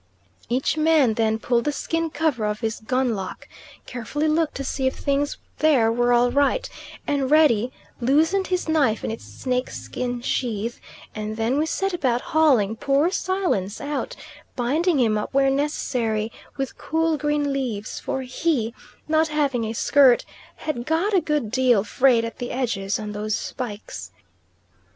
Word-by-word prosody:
Each 260 +5 0
man 310 -6 +4
then 220 0 +1
pulled 235 +1 0
the 295 - +2
skin 330 +3 -2
cover 295 -7 0
off 210 +1 -3
his 225 -1 -2
gun 255 +2 0
lock, 190 -3 -6 0.4
carefully 250 +6 -2
looked 310 0 +1
to 275 - -3
see 265 0 -1
if 260 - -1
things 285 0 -1 0.2
there 270 -8 +4
were 240 +1 +2
all 245 0 +4
right 285 - +2 0.4
and 275 -2 0
ready 260 -6 +4 0.3
loosened 320 +10 +2
his 365 -2 -1
knife 285 -9 +2
in - - -2
its 225 - -7
snake 255 -1 -2
skin 245 -1 -4
sheath; 235 -2 -2 0.3
and 215 0 -4
then 235 +5 +1
we 315 - +1
set 390 +3 -1
about 255 -8 +1
hauling 260 -10 +4
poor 280 +8 +2
Silence 365 - -1
out, 295 +12 -3 0.4
binding 290 +6 +1
him 220 -3 +2
up 210 - -6
where 270 0 +4
necessary 240 -6 -1 0.3
with 270 -1 -4
cool 325 0 +1
green 295 -1 0
leaves; 235 -6 -3
for 265 - -3
he, 255 -3 -1 0.3
not 315 +1 +3
having 285 -6 0
a 220 - -3
skirt, 260 +1 +4 0.3
had 245 -6 -4
got 335 +7 +1
a 375 - +4
good 295 -9 -1
deal 250 -5 +3
frayed 240 +1 +3
at 230 - -7
the 245 - -4
edges 210 -6 -1
on 210 -1 -5
those 210 +1 -2
spikes. 220 -5 -6
260 Hz, 160 wpm, -23 LUFS, 230-300 Hz, 0.4 s, man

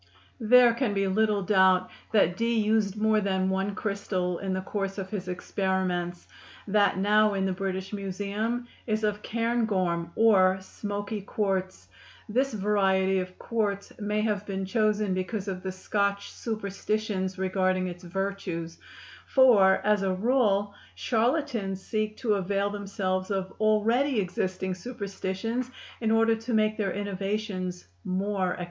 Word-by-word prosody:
There 240 +1 +6
can 235 -4 -1
be 195 0 +1
little 210 +1 +2
doubt 185 -2 +4 0.2
that 195 -5 +3
Dee 230 +3 0
used 215 -2 +2
more 215 0 +3
than 190 -1 0
one 195 +1 -1
crystal 195 -4 -2
in 195 -1 -3
the 185 - -1
course 195 0 -3
of 190 -1 -5
his 190 -4 -4
experiments; 180 -1 -2 0.4
that 205 -1 +3
now 210 +1 +3
in 190 -1 0
the 190 - 0
British 190 +1 -4
Museum 205 +5 -3 0.2
is 215 -1 0
of 210 0 0
cairngorm, 210 -8 0
or 190 -4 +5
"smoky 205 +2 -5
quartz." 190 -2 -2 0.4
This 260 +5 +1
variety 195 -2 +2
of 185 0 -6
quartz 205 -3 -2
may 210 0 0
have 210 -2 0
been 195 -1 -3
chosen 215 -1 +1
because 190 +2 -3
of 185 -2 -3
the 190 - -3
Scotch 200 +1 -1
superstitions 205 -3 -3
regarding 185 0 +1
its 180 0 -6
virtues; 180 -2 -4 0.5
for, 215 -8 +6
as 210 -1 +3
a 190 -1 0
rule, 205 -2 +2 0.2
charlatans 230 -5 0
seek 215 +1 -2
to 230 -5 +1
avail 200 +1 0
themselves 195 -2 -2
of 190 -2 -2
already 225 +5 +2
existing 185 0 -2
superstitions 200 +3 -4 0.3
in 225 - 0
order 225 0 +4
to 225 +1 -3
make 215 0 +2
their 205 -3 -1
innovations 195 -2 -3 0.2
more 190 0 -1
acceptable. - - -9
200 Hz, 140 wpm, -27 LUFS, 190-215 Hz, 0.5 s, There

